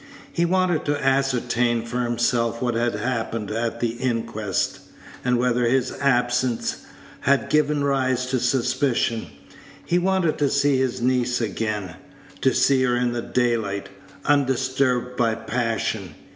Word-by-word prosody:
He 170 - +2
wanted 180 -2 +1
to 145 0 0
ascertain 125 -3 +1
for 125 +2 -2
himself 120 -1 0
what 120 -1 0
had 120 -1 0
happened 115 -1 -2
at 115 +1 -2
the 120 - +1
inquest, 115 -5 -2 0.4
and 125 -1 +2
whether 125 0 +1
his 130 +2 +2
absence 125 -2 0 0.3
had 140 0 +1
given 150 -1 +2
rise 130 -2 +1
to 130 - +1
suspicion. 120 -3 0 0.6
He 175 - +2
wanted 185 -3 +1
to 145 -2 +2
see 140 0 +2
his 125 -2 -1
niece 125 -1 +1
again 105 -5 -3 0.4
to 130 - +4
see 135 0 +3
her 125 -1 +2
in 120 0 0
the 120 - -2
daylight, 115 -6 -1 0.4
undisturbed 130 -2 +1
by 115 -3 +2
passion. 110 -4 -2
125 Hz, 135 wpm, -23 LUFS, 115-135 Hz, 0.6 s, to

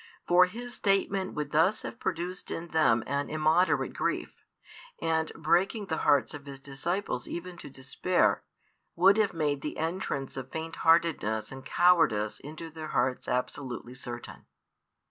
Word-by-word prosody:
For 180 +1 +6
His 240 +5 -7
statement 195 -2 0
would 150 -1 -3
thus 180 +8 +3
have 230 - -7
produced 180 +3 -3
in 170 +1 -5
them 150 -9 +3
an 140 +1 -2
immoderate 155 +4 +2
grief, - - -2 0.7
and, 160 -1 0
breaking 190 +6 +1
the 160 -4 -2
hearts 145 -1 +3
of 145 -1 -9
His 135 -1 -8
disciples 140 +9 -3
even 175 +1 -6
to - - -9
despair, 135 +7 +1 0.5
would 190 +4 +6
have 215 -4 +2
made 145 -3 0
the 150 - -5
entrance 160 -5 -3
of 130 0 -6
faint 160 +1 -5
heartedness 165 - +2
and 135 0 -8
cowardice 160 -13 +3
into 160 +3 -8
their 155 0 -7
hearts 130 -4 0
absolutely 125 0 -3
certain. 120 -2 -8
160 Hz, 145 wpm, -29 LUFS, 135-180 Hz, 0.7 s, For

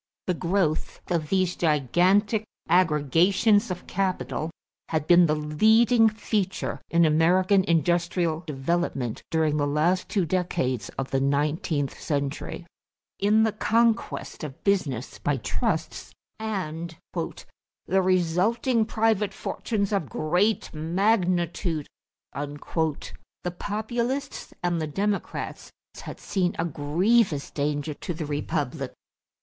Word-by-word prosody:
The 180 - +1
growth 175 -2 -1
of 160 -3 0
these 185 -2 +1
gigantic 180 - +2 0.2
aggregations 180 - +3
of 180 -1 -5
capital 185 -4 -2 0.4
had 155 -2 -1
been 175 +1 +6
the 150 - +2
leading 220 +10 +4
feature 210 -3 -2
in 170 0 +4
American 180 +5 +4
industrial 170 0 +1
development 135 -4 -1
during 155 -2 +1
the 145 -1 +1
last 160 +6 +1
two 195 -5 +1
decades 150 - -1
of 135 0 -3
the 135 - +2
nineteenth 145 +1 0
century. 145 +3 -3 0.5
In 210 +2 +4
the 220 - +2
conquest 230 -2 0
of 150 +1 -8
business 155 - 0
by 145 -2 0
trusts 115 - -3 0.2
and 170 -6 -4 0.2
"the 190 +1 -4
resulting 190 +7 +2
private 215 -3 +1
fortunes 205 -3 -2
of 170 - -1
great 180 - 0
magnitude," 175 -1 0 0.5
the 150 +4 -4
Populists 240 +6 -3
and 175 -2 0
the 155 - -2
Democrats 200 +6 -3 0.3
had - - -8
seen 185 -2 -1
a 165 - 0
grievous 170 +3 +1
danger 145 +1 -1
to 170 +3 -5
the 155 -1 -4
republic. 145 -1 -3
175 Hz, 110 wpm, -26 LUFS, 150-200 Hz, 0.5 s, been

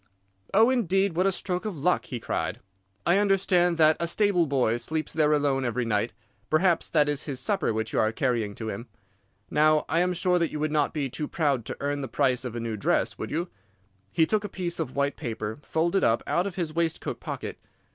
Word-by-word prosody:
"'Oh, 225 +5 +5
indeed! 195 -6 +1
What 185 +3 +2
a - - +3
stroke 180 -1 -3
of 210 -6 -4
luck!' 175 +6 +1
he 125 - -5
cried. 90 -4 -3 0.5
'I 180 +3 +4
understand 185 -4 +3
that 155 -1 +5
a 170 - 0
stable 180 -2 +2
boy 125 -5 +1
sleeps 155 +5 -3
there 155 -1 +3
alone 145 -3 +2
every 120 0 -1
night. 110 0 0 0.4
Perhaps 170 +2 +2
that 150 -2 +3
is 145 0 -2
his 135 -4 -3
supper 190 - +1
which 110 0 -3
you - - +2
are 110 - +2
carrying 115 -5 -1
to 110 - -6
him. 115 +2 -6 0.6
Now 155 0 +4
I 165 - +1
am 180 +1 +2
sure 180 0 +2
that 170 -2 +1
you 150 - -4
would 155 0 -1
not 150 -2 +1
be 145 -3 0
too 150 +4 -4
proud 140 -8 0
to - - -5
earn 145 0 -1
the 135 - -4
price 130 -1 +1
of 125 -2 -5
a - - -2
new 115 -1 -3
dress, 100 - 0
would - - -4
you?' 170 +4 -2 0.6
He 160 - +3
took 215 +4 0
a 205 - -4
piece 175 -2 -3
of 150 -6 -3
white 140 0 0
paper 110 -4 -4
folded 170 +6 0
up 115 - +2
out 180 +3 +1
of 190 - -6
his 170 -5 -3
waistcoat 165 -1 -2
pocket. - - -6
155 Hz, 220 wpm, -27 LUFS, 130-180 Hz, 0.6 s, Oh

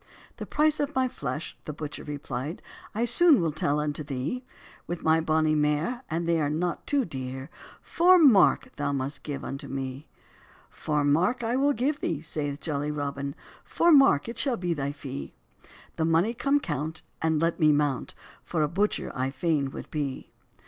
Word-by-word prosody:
"The - - -6
price 305 0 +2
of 290 0 -2
my 260 0 +2
flesh," 145 - -5
the 150 - -5
butcher 150 0 -6
repli'd, 145 +1 -5 0.3
"I 230 +2 +1
soon 295 +5 +6
will 165 -2 0
tell 150 -1 0
unto 150 0 -2
thee; 145 - -3 0.4
With 175 -1 -5
my 160 0 +4
bonny 155 -1 +2
mare, 150 +11 0
and 165 +1 -2
they 170 -1 +2
are 145 - +1
not 170 +3 -2
too 280 -3 +2
dear, 130 -1 -6 0.3
Four 360 +2 +5
mark 260 - +5
thou 145 -1 -1
must 140 +1 -3
give 140 -2 -5
unto 135 - -6
me." 135 +2 -5 0.6
"Four 150 -1 -1
mark 175 - +2
I 230 +2 0
will 285 +2 +3
give 280 +5 -1
thee," 160 - -2
saith 150 -2 -3
jolly 150 -2 -2
Robin, 140 -1 -3 0.3
"Four 340 - +2
mark 270 - +6
it 235 - -5
shall 265 -4 +1
be 175 -1 -1
thy 140 -2 -2
fee; 70 - -7 0.6
The 160 - +1
mony 165 +8 +2
come 275 +4 +2
count, 160 - -4 0.2
and 160 -1 +2
let 165 +2 0
me 155 -2 +5
mount, 145 -2 0 0.3
For 160 -3 -1
a - - +2
butcher 200 +7 -1
I 130 0 -1
fain 145 -1 0
would - - -9
be." 145 -4 -4
155 Hz, 180 wpm, -27 LUFS, 145-215 Hz, 0.6 s, soon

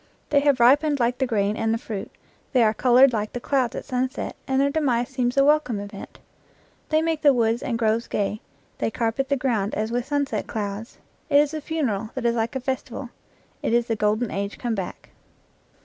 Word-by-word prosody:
They 285 - +5
have 280 -2 +2
ripened 285 +4 +4
like 245 +1 +1
the 265 - +1
grain 210 -3 0
and 225 0 0
the 225 - +1
fruit; 215 -4 -6 0.4
they 250 -3 +5
are 215 -1 +3
colored 255 +3 +5
like 215 -1 -2
the 245 - -3
clouds 255 -1 0
at - - -5
sunset; 255 -1 -2
and 265 0 +1
their 280 +1 +3
demise 260 -6 +1
seems 255 -1 -1
a 275 - +5
welcome 290 -7 +2
event. 200 0 -9 0.7
They 310 0 +2
make 325 -2 -1
the 285 -3 +5
woods 230 0 +1
and 230 - -2
groves 225 0 +1
gay; 210 +1 -2 0.4
they - - 0
carpet 230 +4 -1
the 280 - +2
ground 225 -6 -1
as 215 +2 -2
with 245 +1 -2
sunset 285 -1 -1
clouds; 210 0 -5 0.3
it 285 - +5
is 295 +1 +3
a 310 - -3
funeral 245 -10 -2
that 260 -2 -3
is 235 - +3
like 230 +2 -1
a - - 0
festi 260 0 -3
val; 245 +1 -7 0.5
it - - -1
is 240 0 +2
the 230 - -1
golden 215 +2 0
age 200 +1 -3
come 240 -2 -2
back. 190 -4 -6
245 Hz, 210 wpm, -24 LUFS, 220-275 Hz, 0.7 s, They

